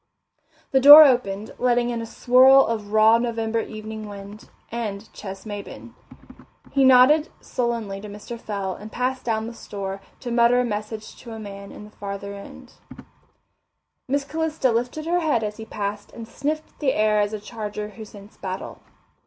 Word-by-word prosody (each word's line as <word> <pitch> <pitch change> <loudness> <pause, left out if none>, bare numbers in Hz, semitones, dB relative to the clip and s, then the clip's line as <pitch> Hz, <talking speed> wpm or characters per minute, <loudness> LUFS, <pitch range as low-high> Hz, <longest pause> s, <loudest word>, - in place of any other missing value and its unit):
The 265 - +4
door 290 +3 +12
opened, 220 -6 0
letting 245 -1 +2
in 235 -1 -3
a 230 - -6
swirl 260 +3 +5
of 215 -3 -4
raw 220 +1 +5
November 230 -1 -1
evening 215 -1 -7
wind 200 +1 -11 0.2
and 220 -2 -5
Ches 195 -1 -9
Maybin. 205 -2 -8 0.8
He 275 - +2
nodded 265 +5 +6
sullenly 230 -5 -3
to 210 - -8
Mr. 210 +3 -9
Fell 200 -3 -4
and 210 +4 -10
passed 255 +1 -2
down 220 -2 -1
the 230 - -7
store 195 -3 -6 0.2
to 245 - -5
mutter 235 +1 +4
a 250 - +1
message 215 0 -5
to 235 -3 -10
a 220 - -8
man 200 -1 -9
at - - -11
the 210 0 -15
further 200 0 -6
end. 200 0 -12 1.4
Miss 280 +2 0
Calista 315 -3 -1
lifted 245 +7 -2
her 350 +2 +1
head 300 -9 0
as 210 0 -4
he 220 - -8
passed 205 -1 -5
and 230 -1 -9
sniffed 305 +6 -4
the 275 -3 +1
air 215 0 +2
as 205 0 0
a 215 - -4
charger 210 -1 -6
who 220 +1 -10
scents 205 -1 -14
battle. 185 -1 -6
220 Hz, 170 wpm, -23 LUFS, 205-250 Hz, 1.4 s, door